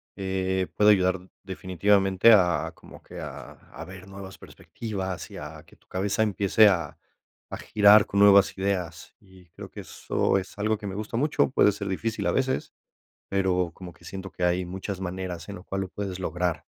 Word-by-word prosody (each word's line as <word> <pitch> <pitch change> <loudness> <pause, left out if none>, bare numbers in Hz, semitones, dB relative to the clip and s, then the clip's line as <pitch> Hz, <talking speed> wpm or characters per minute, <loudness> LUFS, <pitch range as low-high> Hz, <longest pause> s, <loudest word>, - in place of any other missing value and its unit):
eh, 95 -1 -1
puede 105 0 +4
ayudar 95 -2 +2
definitivamente 95 +2 +2
a 90 -4 +3
como - - -15
que - - -10
a - - -8
a 80 - -12
ver 95 +1 -11
nuevas 95 -1 -10
perspectivas 95 -5 -6
y - - -10
a 75 +1 -9
que - - -19
tu - - -33
cabeza 100 +4 0
empiece 105 +1 +4
a 85 -7 0 0.5
a - - -4
girar 105 0 +5
con 100 - -1
nuevas 100 -1 +6
ideas 90 -4 -3
y 95 -2 -19
creo - - -11
que - - -9
eso 95 - -1
es 95 - -10
algo 105 +1 0
que 105 - -6
me 95 - -5
gusta 105 +2 -4
mucho. 145 +1 +1
Puede 105 - +4
ser 100 0 -6
difícil 110 +4 -3
a - - +2
veces, 130 0 -1 0.6
pero 95 -3 +1
como 90 -2 -10
que - - -22
siento 95 0 -7
que 90 +2 -4
hay 90 +1 +1
muchas 95 +1 -6
maneras 90 -2 -5
en 100 - -6
lo 90 - -12
cual 95 0 -4
lo 95 - -5
puedes 95 -1 -5
lograr. 90 -4 -2
95 Hz, 190 wpm, -26 LUFS, 90-100 Hz, 0.6 s, nuevas